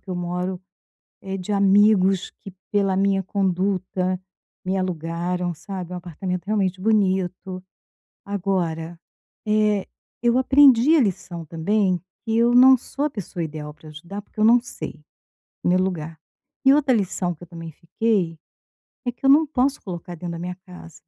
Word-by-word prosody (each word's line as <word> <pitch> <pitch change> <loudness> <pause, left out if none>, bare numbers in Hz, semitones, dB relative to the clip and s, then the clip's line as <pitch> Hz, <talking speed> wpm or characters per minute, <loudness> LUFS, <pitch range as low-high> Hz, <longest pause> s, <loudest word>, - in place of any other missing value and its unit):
que - - -30
eu - - -2
moro 180 +1 -3 0.6
é 195 0 -5
de 185 +2 -7
amigos, 195 -1 +4
que 195 - -10 0.2
pela 195 -2 +1
minha 195 0 +2
conduta 185 -1 -1 0.4
me 190 +1 -1
alugaram, 175 0 -2
sabe, 185 +1 -7
é - - -4
um - - -4
apartamento 180 +2 -5
realmente 195 -3 0
bonito. 190 -3 0 0.6
Agora, 175 -4 -2 0.5
eh, 210 -2 +2 0.3
eu 240 +1 +3
aprendi 270 +2 +6
a 295 - +5
lição 175 -5 -3
também, 185 +3 0 0.3
que 225 -1 -1
eu 235 +1 +4
não 260 +2 +8
sou 280 +4 -4
a - - +1
pessoa 185 -7 -5
ideal 150 -1 -6
para 155 - -16
ajudar, 170 +7 -8
porque 210 - -14
eu 215 - +3
não 235 +2 +6
sei, 250 - -8 0.7
no 175 - +3
meu 185 - +4
lugar. 165 -4 -2 0.5
E 270 - +7
outra 280 -4 +3
lição 185 -4 -1
que 155 - -20
eu 175 - -9
também 165 -1 -9
fiquei, 175 0 -1 0.7
é 245 - 0
que 245 - -9
eu 270 - +5
não 305 +3 +6
posso 275 -1 0
colocar 175 -1 -7
dentro 170 +1 -6
da 165 - -6
minha 180 +1 -5
casa. 180 -2 -12
190 Hz, 165 wpm, -23 LUFS, 175-215 Hz, 0.7 s, não